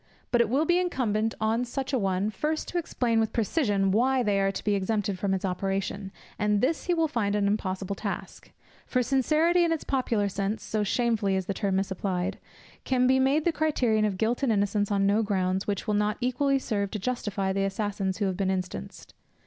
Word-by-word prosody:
But 240 Hz, -, +4 dB
it 230 Hz, -, +1 dB
will 280 Hz, +6 st, +2 dB
be 350 Hz, +2 st, +3 dB
incumbent 225 Hz, -, 0 dB
on 220 Hz, +2 st, +1 dB
such 265 Hz, +2 st, -4 dB
an 255 Hz, -, +2 dB
one, 195 Hz, +2 st, 0 dB
first 305 Hz, +9 st, -2 dB
to 355 Hz, -, -1 dB
explain 240 Hz, -8 st, 0 dB
with 220 Hz, -1 st, +1 dB
precision 205 Hz, -, +1 dB
why 250 Hz, +5 st, +2 dB
they 205 Hz, -3 st, +1 dB
are 195 Hz, 0 st, +2 dB
to -, -, -6 dB
be 210 Hz, -, +1 dB
exempted 200 Hz, -1 st, -1 dB
from 200 Hz, 0 st, 0 dB
its 190 Hz, 0 st, -1 dB
operation, 195 Hz, +1 st, -2 dB, 0.3 s
and 210 Hz, -1 st, +2 dB
this 290 Hz, +8 st, 0 dB
he 355 Hz, -, +2 dB
will 325 Hz, -1 st, +2 dB
find 210 Hz, -8 st, -1 dB
an 205 Hz, -1 st, +1 dB
impossible 200 Hz, -1 st, -1 dB
task; -, -, -6 dB, 0.4 s
for 255 Hz, -1 st, +1 dB
sincerity, 310 Hz, +7 st, +3 dB
in 335 Hz, -, +1 dB
its 325 Hz, -, -1 dB
popular 235 Hz, -6 st, 0 dB
sense, 200 Hz, +2 st, -2 dB
so 215 Hz, -, -2 dB
shamefully 210 Hz, -2 st, +1 dB
is 190 Hz, -1 st, -1 dB
the 195 Hz, -, -2 dB
term 195 Hz, -1 st, -1 dB
misapplied, 190 Hz, -1 st, -2 dB, 0.4 s
can 255 Hz, -1 st, +2 dB
be 260 Hz, +1 st, +4 dB
made 275 Hz, +4 st, +2 dB
the 340 Hz, -, +4 dB
criterion 265 Hz, -9 st, +1 dB
of 200 Hz, -3 st, -1 dB
guilt 225 Hz, +5 st, 0 dB
and 270 Hz, -4 st, +2 dB
innocence 205 Hz, 0 st, +1 dB
on 200 Hz, -1 st, +2 dB
no 205 Hz, +3 st, +3 dB
grounds, 190 Hz, -2 st, 0 dB
which 200 Hz, -2 st, -2 dB
will 210 Hz, -, 0 dB
not 210 Hz, +1 st, +1 dB
equally 270 Hz, +2 st, +1 dB
serve 205 Hz, -6 st, -2 dB
to 215 Hz, -, -4 dB
justify 205 Hz, -3 st, -2 dB
the 195 Hz, 0 st, 0 dB
assassins 195 Hz, -1 st, -2 dB
who 205 Hz, -, 0 dB
have 190 Hz, -1 st, -1 dB
been 195 Hz, 0 st, 0 dB
instanced. 185 Hz, -1 st, -5 dB
210 Hz, 210 wpm, -27 LUFS, 195-255 Hz, 0.4 s, But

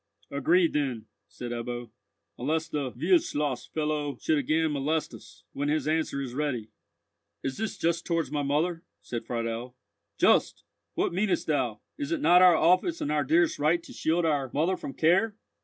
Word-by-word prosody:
"Agreed 165 Hz, +5 st, +3 dB
then," 135 Hz, -7 st, -1 dB, 0.2 s
said 120 Hz, -1 st, -7 dB
Ebbo, 120 Hz, 0 st, -5 dB, 0.5 s
"unless 155 Hz, +5 st, 0 dB
the 145 Hz, -5 st, -3 dB
Wildschloss 150 Hz, -2 st, 0 dB
fellow 150 Hz, -3 st, -2 dB
should 155 Hz, -2 st, +1 dB
again 155 Hz, +3 st, +1 dB
molest 150 Hz, +3 st, -1 dB
us, -, -, -14 dB
when 145 Hz, +1 st, -2 dB
his 150 Hz, -1 st, 0 dB
answer 155 Hz, -2 st, 0 dB
is 125 Hz, -3 st, -6 dB
ready." 125 Hz, -6 st, -2 dB, 0.7 s
"Is 135 Hz, -, -3 dB
this 220 Hz, 0 st, -3 dB
just 170 Hz, +1 st, 0 dB
towards 165 Hz, -2 st, -1 dB
my 150 Hz, -1 st, -1 dB
mother?" 155 Hz, +5 st, 0 dB, 0.2 s
said 120 Hz, -2 st, -5 dB
Friedel. 115 Hz, +1 st, -3 dB, 0.4 s
"Just! -, -, +3 dB, 0.3 s
What -, -, 0 dB
mean'st 195 Hz, +2 st, 0 dB
thou? 125 Hz, -8 st, -1 dB, 0.2 s
Is 290 Hz, +2 st, -3 dB
it 330 Hz, -, 0 dB
not 180 Hz, -10 st, +6 dB
our 180 Hz, -2 st, +8 dB
office 185 Hz, -, +3 dB
and 150 Hz, -, -2 dB
our 150 Hz, -1 st, +2 dB
dearest 165 Hz, +5 st, +2 dB
right 165 Hz, +4 st, +2 dB
to -, -, -12 dB
shield 165 Hz, +2 st, 0 dB
our 145 Hz, -4 st, 0 dB
mother 170 Hz, +5 st, +1 dB
from 135 Hz, -7 st, -7 dB
care? 190 Hz, +8 st, +3 dB
150 Hz, 170 wpm, -28 LUFS, 135-170 Hz, 0.7 s, our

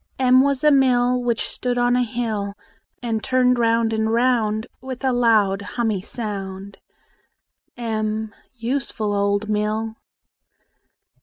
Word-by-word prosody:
M 255 Hz, 0 st, +5 dB
was 280 Hz, 0 st, 0 dB
a 300 Hz, -, +6 dB
mill 250 Hz, -2 st, +3 dB
Which 235 Hz, -2 st, -1 dB
stood 245 Hz, -1 st, -3 dB
on 245 Hz, 0 st, +3 dB
a 250 Hz, -, +3 dB
hill, 220 Hz, -4 st, -2 dB, 0.5 s
And 225 Hz, -2 st, -2 dB
turned 250 Hz, -1 st, +2 dB
round 230 Hz, -1 st, +2 dB
and 220 Hz, 0 st, 0 dB
round 230 Hz, -3 st, +1 dB, 0.2 s
With 260 Hz, 0 st, -7 dB
a 260 Hz, -, +2 dB
loud 215 Hz, -5 st, +3 dB
hummy 215 Hz, -2 st, -2 dB
sound. 195 Hz, -3 st, -6 dB, 1.0 s
m 220 Hz, -2 st, -2 dB, 0.2 s
Useful 235 Hz, -3 st, -2 dB
old 200 Hz, +1 st, 0 dB
mill! 215 Hz, +1 st, -1 dB
230 Hz, 125 wpm, -22 LUFS, 215-250 Hz, 1.0 s, a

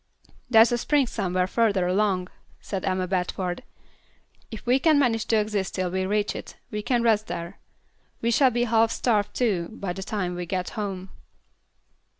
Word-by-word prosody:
"There's 225 Hz, -1 st, +6 dB
a 240 Hz, -, +1 dB
spring 290 Hz, +2 st, +2 dB
somewhere 185 Hz, -6 st, -1 dB
further 200 Hz, -2 st, +1 dB
along," 185 Hz, -1 st, +1 dB, 0.3 s
said 195 Hz, -2 st, -5 dB
Emma 185 Hz, -1 st, 0 dB
Bradford. 180 Hz, -1 st, -2 dB, 0.9 s
"If 220 Hz, -, -9 dB
we 250 Hz, +2 st, +3 dB
can 310 Hz, +1 st, +4 dB
manage 235 Hz, -5 st, +2 dB
to 225 Hz, -, +2 dB
exist 210 Hz, -3 st, -1 dB
till 185 Hz, -2 st, -1 dB
we 185 Hz, 0 st, -1 dB
reach 205 Hz, +1 st, 0 dB
it, -, -, -8 dB
we 210 Hz, -, -3 dB
can 240 Hz, +2 st, +1 dB
rest 220 Hz, -2 st, +2 dB
there. 170 Hz, +3 st, -6 dB, 0.6 s
We 235 Hz, -, 0 dB
shall 260 Hz, +3 st, +5 dB
be 240 Hz, 0 st, 0 dB
half 225 Hz, -1 st, +3 dB
starved, 215 Hz, -4 st, 0 dB
too, 195 Hz, -9 st, 0 dB
by 200 Hz, -5 st, -4 dB
the 190 Hz, -, -7 dB
time 190 Hz, -2 st, -3 dB
we 175 Hz, 0 st, -5 dB
get 185 Hz, 0 st, -2 dB
home." 195 Hz, -4 st, -5 dB
205 Hz, 170 wpm, -25 LUFS, 185-230 Hz, 0.9 s, There's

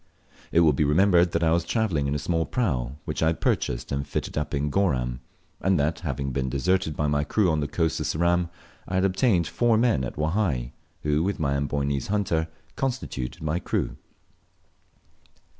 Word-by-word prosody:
It 85 Hz, -, +4 dB
will 80 Hz, -3 st, +5 dB
be 70 Hz, -, +1 dB
remembered 85 Hz, +3 st, +4 dB
that 85 Hz, 0 st, 0 dB
I 80 Hz, -, +3 dB
was 85 Hz, +1 st, +2 dB
travelling 85 Hz, -7 st, 0 dB
in 70 Hz, -, -1 dB
a -, -, +2 dB
small 80 Hz, +3 st, 0 dB
prau, 70 Hz, -, -1 dB
which -, -, -3 dB
I 80 Hz, -, +3 dB
had 80 Hz, -, 0 dB
purchased -, -, -1 dB
and 70 Hz, +1 st, -2 dB
fitted -, -, -3 dB
up 75 Hz, -1 st, -2 dB
in 70 Hz, +1 st, -1 dB
Goram, 65 Hz, -10 st, 0 dB, 0.4 s
and 95 Hz, -3 st, +2 dB
that, 75 Hz, +3 st, 0 dB
having 70 Hz, -5 st, -3 dB
been 65 Hz, 0 st, -1 dB
deserted 80 Hz, +3 st, 0 dB
by 75 Hz, -, 0 dB
my 75 Hz, 0 st, +1 dB
crew 95 Hz, +3 st, +2 dB
on 80 Hz, -, +1 dB
the 75 Hz, -, -1 dB
coast 80 Hz, +2 st, 0 dB
of -, -, -2 dB
Ceram, 85 Hz, +1 st, +1 dB, 0.4 s
I 90 Hz, -, -3 dB
had 95 Hz, +1 st, +3 dB
obtained 95 Hz, -2 st, +2 dB
four 115 Hz, +8 st, +2 dB
men 115 Hz, -, +2 dB
at -, -, -5 dB
Wahai, 75 Hz, -, 0 dB, 0.3 s
who, 75 Hz, +1 st, +2 dB
with 100 Hz, +3 st, -1 dB
my 70 Hz, -3 st, +1 dB
Amboynese 70 Hz, 0 st, -1 dB
hunter, 95 Hz, -6 st, 0 dB, 0.3 s
constituted 120 Hz, -, -3 dB
my 80 Hz, +3 st, 0 dB
crew. -, -, -2 dB
80 Hz, 190 wpm, -26 LUFS, 70-90 Hz, 0.4 s, will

